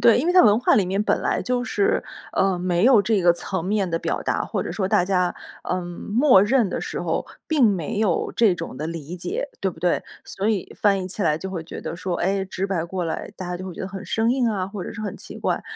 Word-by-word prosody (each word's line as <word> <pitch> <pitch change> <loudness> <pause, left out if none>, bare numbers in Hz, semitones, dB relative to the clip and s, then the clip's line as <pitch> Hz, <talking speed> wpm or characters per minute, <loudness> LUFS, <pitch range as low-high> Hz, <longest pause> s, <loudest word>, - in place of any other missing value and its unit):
对， 235 0 +6
因 300 - -2
为 355 - +3
它 365 - +7
文 215 0 +5
化 - - +4
里 200 - +4
面 195 +3 0
本 - - +1
来 - - 0
就 250 0 -1
是， 405 - +1 0.3
呃， 190 -2 +2
没 180 +2 +1
有 255 -4 +7
这 205 -2 +1
个 175 - +6
层 175 0 -4
面 195 -2 0
的 165 - 0
表 - - -2
达， - - 0
或 - - -2
者 - - -5
说 190 -3 -1
大 195 -3 +3
家， 180 -2 +1 0.3
嗯， 180 -1 -1
默 205 +5 +3
认 235 -1 +3
的 - - -3
时 - - -4
候 - - -1 0.2
并 300 -6 +3
没 190 -1 -1
有 200 -6 +1
这 215 -6 +5
种 165 -6 -6
的 150 +4 -3
理 165 +1 -6
解， 180 +11 -3
对 190 - 0
不 160 - -14
对？ 175 0 +1 0.2
所 200 +3 -2
以 200 -5 -3
翻 200 -2 +3
译 185 - -5
起 200 +2 -4
来 155 -2 +2
就 190 - -5
会 170 -4 -5
觉 - - -8
得 170 - -5
说， 180 -1 -2
哎， 195 +2 0
直 190 0 -3
白 175 -4 -1
过 180 0 -3
来， 165 - -4
大 180 -1 -6
家 180 - -3
就 185 - -7
会 185 - -6
觉 - - -8
得 190 - -4
很 195 0 -7
生 225 +1 +1
硬 255 -2 +2
啊， 190 -3 -1
或 200 -2 -6
者 - - -6
是 - - -7
很 215 - -4
奇 - - -10
怪。 - - -1
190 Hz, 290 characters per minute, -23 LUFS, 175-215 Hz, 0.3 s, 它